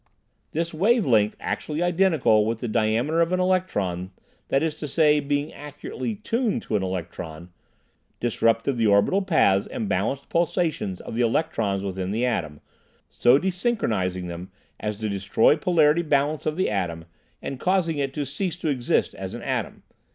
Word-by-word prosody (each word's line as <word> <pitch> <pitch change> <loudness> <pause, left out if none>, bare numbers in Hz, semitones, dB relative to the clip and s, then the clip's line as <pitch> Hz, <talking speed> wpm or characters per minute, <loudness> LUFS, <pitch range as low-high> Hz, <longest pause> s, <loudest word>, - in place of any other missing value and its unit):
This 165 +2 -2
wave 215 +7 +3
length, 110 -4 +3
actually 155 +3 -2
identical 170 - +3
with 115 0 -1
the 120 - -3
diameter 115 +8 +1
of 165 +1 +2
an 185 - +1
electron, 105 - 0 0.4
that 135 +2 +1
is 160 -1 0
to 150 - -4
say, 150 +1 +4
being 145 +1 -2
accurately 150 +9 -6
"tuned" 225 +2 -1
to 110 - -2
an 105 - +1
electron, 85 -2 -5 0.7
disrupted 115 +2 +1
the 115 -1 +2
orbital 100 - +4
paths 100 - +3
and 240 -5 -4
balanced 140 -7 -1
pulsations 165 - -1
of - - -8
the 120 - 0
electrons 110 -6 0
within 95 -1 -3
the 115 +5 0
atom, 80 -12 -2 0.5
so 120 +6 +5
desynchronizing 140 - -1
them 85 +2 -7 0.3
as 105 -1 -3
to 110 0 -3
destroy 100 +6 +3
polarity 160 -1 +3
balance 150 -1 0
of 155 - 0
the 185 - +1
atom 85 -5 -2 0.3
and 135 - -6
causing 180 -5 +1
it 135 -1 -1
to 145 - -2
cease 170 +6 -3
to 170 -2 -3
exist 130 -4 0
as - - -6
an - - -8
atom. - - -3
140 Hz, 165 wpm, -24 LUFS, 100-170 Hz, 0.7 s, so